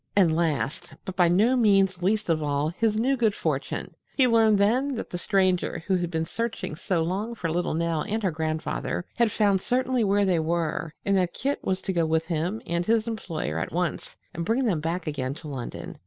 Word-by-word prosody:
And 175 -6 +4
last, 160 -2 -1
but 190 - -5
by 180 -2 +4
no 210 +9 +4
means 195 -6 +3
least 215 +4 +1
of 160 -2 +1
all 145 0 0
his 215 +5 0
new 260 +5 +2
good 225 -4 +1
fortune, - - -3 0.2
he 265 - +5
learned 225 -3 +4
then 250 +7 +2
that 230 - -6
the 175 - -3
Stranger 185 -4 +1
who 190 - +2
had 175 -1 -2
been 160 -1 -1
searching 230 -4 -3
so 170 0 0
long 200 +7 -2
for 165 -7 -3
little 175 -1 -1
Nell 165 -1 0
and 220 +7 -2
her 190 - +2
grandfather 160 +2 -2
had 235 -2 +2
found 200 -3 +2
certainly 255 0 +1
where 200 0 +3
they 180 -3 +2
were 165 0 -1
and 200 - +2
that 180 -2 +1
Kit 280 +3 -2
was 190 0 -1
to 190 - -2
go 170 -2 +1
with 160 0 +1
him 175 +6 -2
and 170 +1 -1
his 225 +3 +1
employer 165 - -3
at - - -3
once 175 +1 -2 0.2
and 170 - -3
bring 230 +8 +1
them 190 -9 +1
back 165 +4 -2
again 135 -3 -3
to 155 -1 -10
London. 130 -5 -6
180 Hz, 215 wpm, -26 LUFS, 165-215 Hz, 0.2 s, he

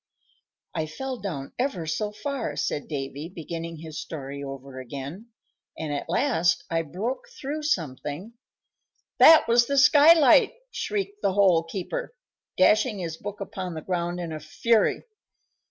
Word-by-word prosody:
"I 160 -2 -2
fell 260 +11 -5
down 165 -9 -5
ever 245 -11 -1
so 205 +7 -2
far," 255 +3 -4
said 145 - -2
Davy, 140 +1 -5
beginning 165 -1 -6
his 160 -1 -7
story 140 -2 -7
over 135 -1 -8
again, 140 - -7 0.5
"and 155 -2 -3
at 145 - -4
last 175 - +2
I 165 0 +2
broke 225 - -4
through 290 +3 -4
something" 165 - -3 0.9
"That 320 -5 +8
was 235 0 +4
the 280 - 0
skylight!" 300 - +7 0.2
shrieked 410 -2 -3
the 195 - +1
Hole 190 -4 +5
keeper, 340 - -5 0.4
dashing 215 +1 +4
his 170 -4 -4
book 205 +2 -7
upon 185 -3 -5
the 160 - -5
ground 175 -1 -2
in 170 -2 -4
a 155 - -5
fury. 215 +9 +1
180 Hz, 140 wpm, -26 LUFS, 155-240 Hz, 0.9 s, That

